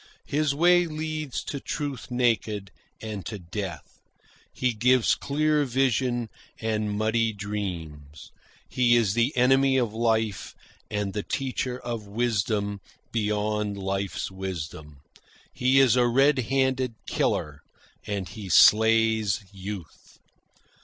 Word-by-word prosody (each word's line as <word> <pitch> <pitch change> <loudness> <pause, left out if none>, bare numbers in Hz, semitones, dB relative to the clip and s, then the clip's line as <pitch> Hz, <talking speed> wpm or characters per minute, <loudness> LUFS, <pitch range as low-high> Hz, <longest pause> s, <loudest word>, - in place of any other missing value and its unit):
His 150 0 0
way 175 +2 +4
leads 155 -3 -4
to 140 - -5
truth 140 -3 -5
naked, 115 -5 0 0.3
and 105 -3 -5
to 110 - -5
death. 85 -3 -7 0.5
He 125 -2 0
gives 125 +2 +3
clear 150 +1 +1
vision, 125 -2 0 0.3
and 110 -2 -1
muddy 110 +1 +1
dreams. 85 -8 -6 0.4
He 120 -1 +3
is 110 -5 +2
the 120 +4 +2
enemy 135 +2 +4
of 120 -4 0
life, 110 -3 -1 0.3
and 105 -2 -2
the 105 - -2
teacher 130 +1 -3
of 115 -3 -5
wisdom 105 -2 -1 0.3
beyond 105 -1 -1
life's 95 0 -3
wisdom. 80 -6 -7 0.5
He 130 +2 +3
is 130 -3 +5
a 125 -1 +4
red 135 +3 +4
handed 130 -3 +1
killer, 75 -1 -1 0.5
and 100 -3 -3
he 105 -4 -8
slays 110 +1 +5
youth." 95 -4 -9
110 Hz, 115 wpm, -26 LUFS, 100-130 Hz, 0.5 s, is